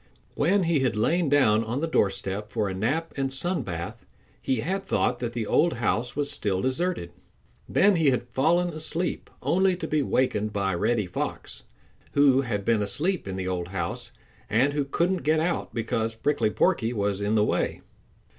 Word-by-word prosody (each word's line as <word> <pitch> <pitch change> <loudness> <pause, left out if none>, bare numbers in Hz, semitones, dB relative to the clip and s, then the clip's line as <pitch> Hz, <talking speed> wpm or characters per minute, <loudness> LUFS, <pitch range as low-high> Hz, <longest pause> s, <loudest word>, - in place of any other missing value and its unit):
When 185 +7 +2
he 165 -3 +2
had 130 -4 +1
lain 165 +9 +1
down 115 -7 +4
on 115 +4 -3
the 165 - 0
doorstep 100 -5 0
for 110 -3 0
a 95 - -3
nap 145 - -1
and 135 -1 -1
sun 175 +7 +1
bath, 85 -2 -6 0.4
he 130 -4 0
had 190 +9 -1
thought 125 - 0
that 120 -1 -3
the 115 -2 -2
old 170 +10 +3
house 120 +1 -1
was 145 0 +1
still 95 -3 0
deserted. 130 - -1 0.6
Then 200 -2 +4
he 160 -4 +4
had 125 - +1
fallen 160 +9 +1
asleep, 165 +2 -3
only 190 +2 +2
to 165 - -4
be 155 -1 +1
wakened 110 -6 0
by 100 -2 0
Reddy 105 +5 +1
Fox, 90 - -5 0.5
who 140 -2 +5
bad 105 -6 -3
been 115 -2 +2
asleep 150 - -1
in 95 - -4
the 95 -1 -3
old 90 -2 -2
house 85 -3 -4 0.4
and 130 +6 +2
who 145 -1 0
couldn't 175 +7 0
get 155 +2 +2
out 170 +2 -1
because 115 -1 -2
Prickly 140 -1 +1
Porky 125 - +1
was 100 -2 -1
in 105 +2 +1
the 105 -1 +4
way. - - -1
125 Hz, 185 wpm, -26 LUFS, 105-160 Hz, 0.6 s, who